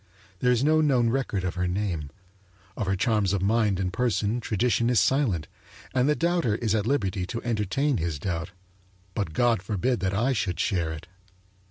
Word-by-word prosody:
There 125 - +3
is 125 +1 +2
no 155 +2 +4
known 125 -6 +3
record 125 -7 -1
of 90 - -2
her 90 0 -1
name; 90 -6 -2 0.7
of 105 - -3
her 95 - +1
charms 105 -1 +1
of 95 -2 0
mind 105 -2 +2
and 90 -1 -2
person 115 -1 0
tradition 115 +1 +1
is 125 -4 +4
silent 105 - +1 0.5
and 130 +2 +2
the 150 - +3
doubter 170 -10 +1
is 110 -2 -1
at 110 -1 0
liberty 100 -8 0
to 115 - -5
entertain 120 +5 0
his 80 -3 -2
doubt; 85 +2 -3 0.6
but 95 -6 -3
God 120 0 +2
forbid 105 +5 -1
that 95 +1 -1
I 120 +6 +2
should 95 -7 -2
share 85 -6 0
it! 80 +2 -7
105 Hz, 185 wpm, -26 LUFS, 95-125 Hz, 0.7 s, no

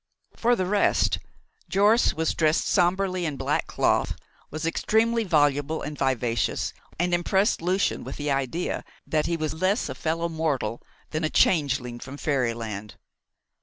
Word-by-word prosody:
For 240 +1 +2
the 185 - -1
rest, 200 +2 +2 0.5
Jorce 205 +4 +4
was 160 0 0
dressed 155 0 +2
sombrely 185 0 +1
in 150 -4 -2
black 135 +3 -1
cloth, - - +1 0.3
was 155 +1 -4
extremely 225 +7 +2
voluble 145 -3 +1
and 150 0 -5
vivacious, 125 -4 0 0.2
and 175 +1 0
impressed 190 +4 +2
Lucian 185 +3 0
with - - -6
the 145 -1 -2
idea 140 +6 -1 0.2
that 155 -1 0
he 170 - 0
was 155 -1 -2
less 190 +7 0
a - - -3
fellow 165 +1 -1
mortal 150 -9 -2 0.3
than 155 +1 -2
a 155 - +1
changeling 135 -9 +2
from 140 +3 -8
fairyland. 115 -8 -2
160 Hz, 145 wpm, -25 LUFS, 140-185 Hz, 0.5 s, Jorce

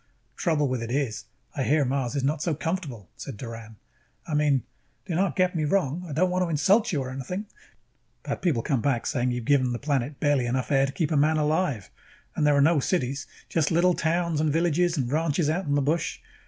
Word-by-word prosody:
"Trouble 155 -4 +1
with 130 -2 -2
it 115 - -5
is, 125 -4 -2 0.3
I 140 - -2
hear 145 +2 +2
Mars 130 0 -1
is 140 - -1
not 145 +2 0
so 160 -1 0
comfortable," 155 - -4
said 135 - -8
Doran. 115 -2 -8 0.5
"I 155 - -5
mean, 145 -3 +2 0.4
do 180 - -4
not 190 +4 +1
get 185 -1 +2
me 160 - 0
wrong, 175 +1 0
I - - -6
don't 180 +5 +1
want 185 0 +1
to 175 - -2
insult 190 +8 +3
you 145 -6 0
or 130 - -6
anything, 140 +11 -5 0.8
but - - -4
people 145 -11 +1
come 135 -5 0
back 130 -3 0
saying 125 -3 0
you 125 0 -2
have - - -11
given 130 -3 +3
the - - -2
planet 140 0 -1
just - - -27
barely 145 -5 +2
enough 130 +3 -1
air 135 -1 +4
to - - -4
keep 155 +1 -1
a - - +2
man 155 +2 +3
alive. 150 - 0 0.4
And 150 - +2
there 145 -1 +4
are - - +5
no 160 +2 +4
cities, 140 -3 -1 0.2
just 155 -4 +1
little 175 +2 +3
towns 170 -1 0
and 155 -1 +2
villages 170 +2 +1
and 125 -3 -1
ranches 155 0 +1
out 180 +4 -2
in 145 - +1
the 145 - +2
bush. 155 +4 -1
145 Hz, 230 wpm, -26 LUFS, 130-165 Hz, 0.8 s, are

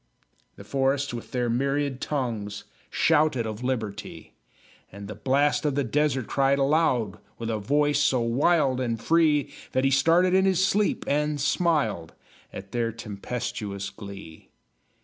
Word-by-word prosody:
The - - -11
forests, 135 +4 0
with 120 - -7
their 125 -1 -1
myriad 135 +2 -1
tongues, 115 -8 -3 0.3
Shouted 150 -7 +2
of 110 +2 -5
liberty; 110 -5 -4 0.6
And 100 +1 -9
the 105 - -6
Blast 135 +9 +1
of 145 -3 0
the 140 - +1
Desert 135 0 0
cried 135 +2 +2
aloud, 135 - +1 0.2
With 115 0 -3
a 110 - -2
voice 145 +6 +1
so 145 -3 +2
wild 130 +3 +2
and 115 -3 -2
free, 155 -1 +2 0.2
That 130 - +1
he 135 - +3
started 165 +7 +4
in 190 0 +4
his 190 -1 +3
sleep 205 +2 0
and 150 +1 0
smiled 145 - 0 0.4
At 100 0 -9
their 115 -1 -1
tempestuous 105 -2 -5
glee. 100 -6 -11
130 Hz, 145 wpm, -26 LUFS, 110-145 Hz, 0.6 s, started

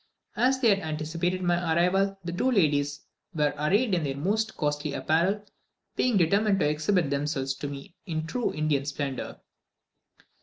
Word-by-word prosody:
As 260 +1 +2
they 240 -3 +4
had 200 -1 +4
anticipated 165 +3 -2
my 175 -1 +2 0.2
arrival, 195 +3 +2
the 170 - -4
two 180 +9 0
ladies 145 - +1 0.3
were 150 -2 +1
arrayed 200 - +1
in 170 -3 +1
their 135 -1 -2
most 215 +8 -1
costly 145 0 -1
apparel; 185 +6 +1 0.5
being 245 -4 +2
determined 200 +3 +3
to 150 - +3
exhibit 155 +1 +1
themselves 140 -1 -1
to 145 - -4
me 140 +3 -8
in 160 -2 -2
true 240 +9 -1
Indian 150 -2 0
splendour. 140 -2 -4
165 Hz, 155 wpm, -27 LUFS, 145-195 Hz, 0.5 s, they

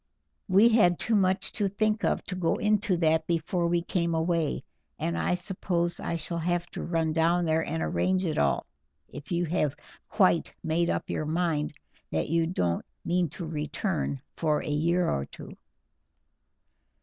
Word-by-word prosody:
We 200 +4 +6
had 180 -7 +4
too 225 - 0
much 190 -1 +2
to 205 -2 0
think 215 +2 0
of - - +1
to - - -6
go 180 -3 +1
into 210 -2 +1
that 160 -1 +2
before 170 +1 0
we 170 0 +1
came 170 -2 0
away, 160 -1 0 0.3
and 85 - -2
I 85 - +1
suppose 180 -2 -1
I - - -2
shall 170 +1 -4
have 175 +1 0
to - - -5
run 165 -2 0
down 170 +2 +2
and 160 0 0
arrange 185 0 +1
it 160 - -1
all, 70 -1 +1 0.4
if 145 - -10
you 175 0 +1
have 150 -4 0 0.3
quite 185 -5 +2
made 170 +2 +1
up - - -1
your 155 - -2
mind 160 -2 0 0.4
that 80 - -1
you 165 0 +2
don't 90 - 0 0.2
mean 175 -1 +1
to 170 +4 -6
return 155 0 -2 0.2
for 155 -2 0
a - - -6
year 170 +4 +2
or 70 0 -1
two." - - -11
170 Hz, 165 wpm, -28 LUFS, 160-180 Hz, 0.4 s, We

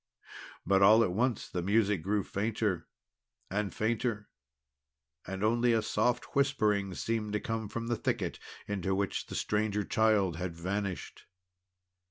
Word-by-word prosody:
But 95 0 +3
all 110 +4 +7
at 95 - 0
once 120 +4 0
the 90 - -3
music 100 0 +2
grew 100 +3 0
fainter 100 -4 -1 0.6
and 100 0 -1
fainter, 110 -1 -1 1.0
and 95 +2 -4
only 120 +2 +3
a 110 -1 +2
soft 120 +3 0
whispering 105 -9 +2
seemed 105 +7 -2
to 105 - +1
come 110 -1 -3
from 115 +1 -4
the 120 0 0
thicket - - -2 0.3
into 95 -2 -1
which 100 0 -2
the - - -7
Stranger 105 0 0
Child 105 -6 +2
had 90 -1 -4
vanished. 95 +2 -4
105 Hz, 140 wpm, -31 LUFS, 95-115 Hz, 1.0 s, all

